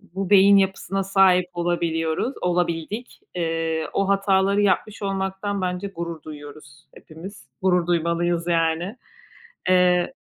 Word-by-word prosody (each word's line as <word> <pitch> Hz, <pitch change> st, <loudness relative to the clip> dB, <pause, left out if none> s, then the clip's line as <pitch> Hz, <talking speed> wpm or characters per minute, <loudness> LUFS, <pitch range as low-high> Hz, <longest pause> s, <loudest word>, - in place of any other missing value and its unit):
bu 195 Hz, -1 st, -3 dB
beyin 200 Hz, 0 st, +7 dB
yapısına 195 Hz, 0 st, 0 dB
sahip 185 Hz, -2 st, +3 dB
olabiliyoruz, 170 Hz, +4 st, -1 dB
olabildik. 175 Hz, +6 st, -2 dB, 0.2 s
Eee, 165 Hz, -2 st, -2 dB
o 195 Hz, -, 0 dB
hataları 195 Hz, 0 st, +2 dB
yapmış 205 Hz, +2 st, 0 dB
olmaktan 195 Hz, 0 st, -3 dB
bence 180 Hz, +2 st, -3 dB
gurur 170 Hz, -3 st, -6 dB
duyuyoruz 145 Hz, -1 st, -12 dB
hepimiz. 175 Hz, +6 st, -12 dB
Gurur 180 Hz, -2 st, +2 dB
duymalıyız, 170 Hz, 0 st, 0 dB
yani. 165 Hz, +4 st, 0 dB, 0.7 s
Eee 180 Hz, -1 st, +3 dB
180 Hz, 110 wpm, -23 LUFS, 165-195 Hz, 0.7 s, beyin